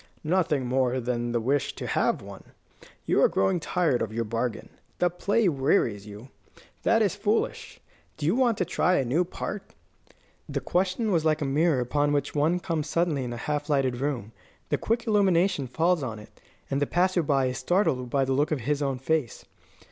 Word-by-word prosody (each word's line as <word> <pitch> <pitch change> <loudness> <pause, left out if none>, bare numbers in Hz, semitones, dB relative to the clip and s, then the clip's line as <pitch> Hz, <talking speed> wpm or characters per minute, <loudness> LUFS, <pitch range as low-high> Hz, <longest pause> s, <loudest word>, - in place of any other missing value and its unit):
"Nothing 155 -5 +1
more 130 0 +1
than 120 -1 -2
the 120 - +1
wish 140 +4 0
to - - -6
have - - 0
one. - - -10 0.6
You - - +2
are - - +5
growing 95 - +1
tired 165 -6 0
of 110 - -2
your 115 +1 -1
bargain. 115 +1 -3 0.3
The 175 -1 +2
play 205 +4 +1
wearies 135 - +1
you. 105 +5 -10 0.5
That 225 -1 +3
is 200 - +1
foolish. 205 +2 -1 0.4
Do 150 - -4
you 170 +8 +2
want 245 -4 +2
to 180 - 0
try 180 +1 +1
a 135 - +1
new 145 +9 +2
part?" 190 +3 -6 0.7
The - - -2
question 190 +5 0
was 165 -4 +2
like 155 -1 +1
a - - -1
mirror 145 +1 +2
upon 145 +4 +1
which 145 - -1
one 155 +4 +2
comes 160 -4 -3
suddenly 165 -5 0
in 125 - -4
a 120 - -5
half 145 +4 -3
lighted 135 -4 +1
room. 130 -5 -3 0.4
A - - +2
quick 230 +1 -1
illumination 190 - +2
falls 165 +5 +1
on 115 -5 -4
it, 105 - -13 0.4
and 135 +1 0
the 145 - +1
passer 180 +1 +2
by 140 -3 +1
is 125 0 -2
startled 130 -5 +1
by 135 +1 +1
the 135 - 0
look 145 +3 +1
of 150 -5 -1
his 145 +5 -1
own 135 -2 -1
face. 135 -1 -2
145 Hz, 195 wpm, -26 LUFS, 125-180 Hz, 0.7 s, are